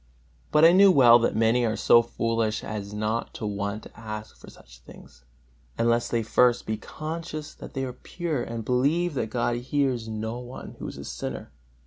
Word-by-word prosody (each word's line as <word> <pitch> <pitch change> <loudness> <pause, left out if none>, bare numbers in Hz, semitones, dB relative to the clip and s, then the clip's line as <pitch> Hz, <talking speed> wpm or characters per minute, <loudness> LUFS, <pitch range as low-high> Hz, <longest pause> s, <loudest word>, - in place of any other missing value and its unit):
But 150 +1 +6
I 165 - +8
know 195 +2 +7
well 120 -8 +7
that 115 - 0
many 115 +2 +3
are 110 -2 0
so 120 - +5
foolish 115 -2 -1
as 105 -2 -5
not 110 +2 -2
to - - -5
want 100 +1 -3
to - - -14
ask 110 -1 -7
for - - -14
such - - -17
things, 60 0 -16 0.5
unless 115 0 +1
they 115 -1 0
first 120 +2 +3
be 110 - -1
conscious 155 +5 -6
that - - -11
they 135 - -1
are 125 - -6
pure, 160 -1 -4
and 115 -1 -5
believe 150 +8 +1
that 125 -5 -2
God 120 +1 0
hears 130 -2 -1
no 110 +2 -4
one 125 +1 -9
who - - -5
is - - -8
a - - -8
sinner. - - -6
120 Hz, 190 wpm, -26 LUFS, 110-135 Hz, 0.5 s, I